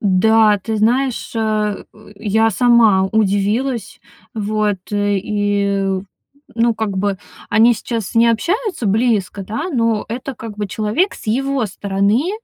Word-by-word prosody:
Да, 210 +2 +4
ты 220 +3 -4
знаешь, 245 +4 0
э, 215 -2 -1
э, 215 -1 -16
я 220 +2 +1
сама 220 -3 +4
удивилась. 215 +3 -1 0.3
Вот, 210 -1 -1
и, 205 -1 0 0.7
ну, 230 0 +2
как 205 -4 -3
бы 200 0 0 0.3
они 230 +2 +5
сейчас 225 -2 -4
не 230 +1 +5
общаются 360 - -1
близко, 205 -2 0
да, 225 - -4
но 230 -5 0
это 255 +3 -5
как 220 -2 -9
бы 205 - -2
человек 220 - -1
с - - -13
его 270 +3 0
стороны, 200 - 0
215 Hz, 130 wpm, -18 LUFS, 205-235 Hz, 0.7 s, они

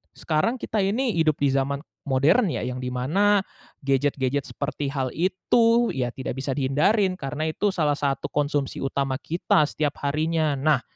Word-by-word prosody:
sekarang 160 +10 0
kita 220 -3 -3
ini 225 +6 +1
hidup 155 -2 +3
di 140 - +3
zaman, 135 +1 -1 0.2
modern 140 - +3
ya - - -3
yang 125 0 -4
di 125 - -4
mana 190 +11 +2 0.4
gadget-gadget 135 0 0
seperti 145 0 -4
hal 135 -3 -2
itu 230 +7 +2
ya 125 -3 -1
tidak 130 +2 -5
bisa 135 - -4
dihindarin 150 - +2
karena 150 -2 -4
itu 205 +6 0
salah 155 -6 +1
satu 140 -1 -2
konsumsi 145 -2 -1
utama 135 -1 -1
kita 170 -1 +1
setiap 145 -2 -2
harinya. 155 +1 0
Nah, 145 -1 +2
145 Hz, 160 wpm, -24 LUFS, 135-185 Hz, 0.4 s, hidup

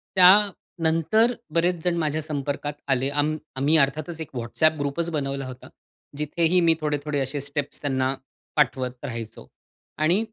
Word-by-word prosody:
त्यानंतर 185 +1 +4 0.2
बरेच 175 +2 +2
जण 175 -1 +1
माझ्या 155 -1 0
संपर्कात 145 -1 -3
आले. 135 0 +1
आम्ही 150 +2 0 0.2
आम्ही 145 +4 +3
अर्थातच 155 +3 0
एक 155 - -6
WhatsApp 155 +7 +1
ग्रुपच 145 +4 -1
बनवला 140 -2 -2
होता. 130 0 -10 0.5
जिथेही 165 +4 +2
मी 165 - +6
थोडे-थोडे 145 -1 -1
असे 135 +1 -2
स्टेप्स 145 0 -4
त्यांना 135 -1 0 0.4
पाठवत 130 -3 +2
राहायचो. 115 -4 -6 0.5
आणि 165 +6 +3
150 Hz, 135 wpm, -25 LUFS, 140-165 Hz, 0.5 s, मी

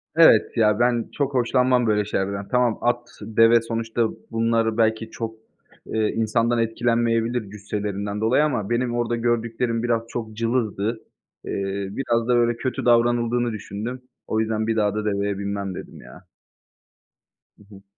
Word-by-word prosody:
Evet, 160 -9 +5
ya, 105 -1 +3
ben 120 -1 +1
çok 140 -1 -1
hoşlanmam 125 -1 +2
böyle 105 -1 +2
şeylerden. 100 -1 -2
Tamam, 125 -3 +2
at, 120 0 0
deve 115 +2 +4
sonuçta 115 0 -1 0.2
bunlar 115 -1 +1
belki 110 0 +1
çok, 115 -1 -5 0.5
eee, 110 -1 0
insandan 115 +1 +1
etkilenmeyebilir 115 -1 0
cüsselerinden 105 0 -4
dolayı 120 +7 +3
ama 115 -9 -2
benim 120 0 0
orada 120 0 0
gördüklerim 115 0 -1
biraz 120 -1 +1
çok 115 -2 -5
cılızdı. 115 -2 -1 0.5
Eee, 100 0 -3
biraz 115 0 -1
da, 125 - +3
böyle, 120 0 +2
kötü 130 +1 -3
davranıldığını 120 0 +2
düşündüm. 110 +4 -6 0.3
O 110 - 0
yüzden 110 0 -1
"Bir 115 - +1
daha 105 -2 +1
da 105 0 -2
deveye 100 -1 -1
binmem" 100 -1 -3
dedim - - -9
ya. - - -14 1.3
Hı - - -19
hı. 95 - -15
115 Hz, 145 wpm, -23 LUFS, 105-120 Hz, 1.3 s, Evet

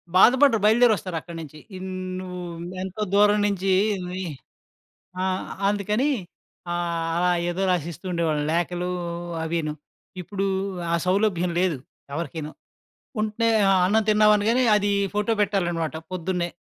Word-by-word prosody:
బాధపడరు, 250 +3 +6
బయలుదేరొస్తారక్కడ 200 -7 +2
నించి. 155 -1 -10 0.2
ఇన్ 190 0 -6 0.3
నువ్వూ 180 -1 -6 0.4
ఎంతో 190 +3 -6
దూరం 205 +1 +5
నించీ 195 -1 0 0.3
మళ్ళీ 185 +1 -4 1.0
ఆ! - - 0 0.4
అందుకనీ 210 +7 +1 0.6
ఆహ్, 170 -1 -1
అలా 180 +1 +2 0.2
ఏదో 175 +2 -2
రాసిస్తూ 170 +1 -3
ఉండేవాళ్ళని 160 -4 0
లేఖలూ 175 +1 -1 0.5
అవీను.ఇప్పుడూ 170 +4 -5 0.5
ఆ - - +5
సౌలభ్యం 185 -2 +1
లేదు 180 -5 +1 0.4
ఎవరికిను. 160 -1 -4 0.7
ఉంటే 220 +2 0 0.2
ఆహ్, 190 - +4
అన్నం 220 +4 +3
తిన్నావనగానే, 215 +3 +4
అది 205 0 +1 0.2
ఫోటో 210 +2 +1
పెట్టాలనమాట 175 -6 0 0.2
పొద్దున్నే. 180 0 -2
185 Hz, 110 wpm, -24 LUFS, 170-210 Hz, 1.0 s, బాధపడరు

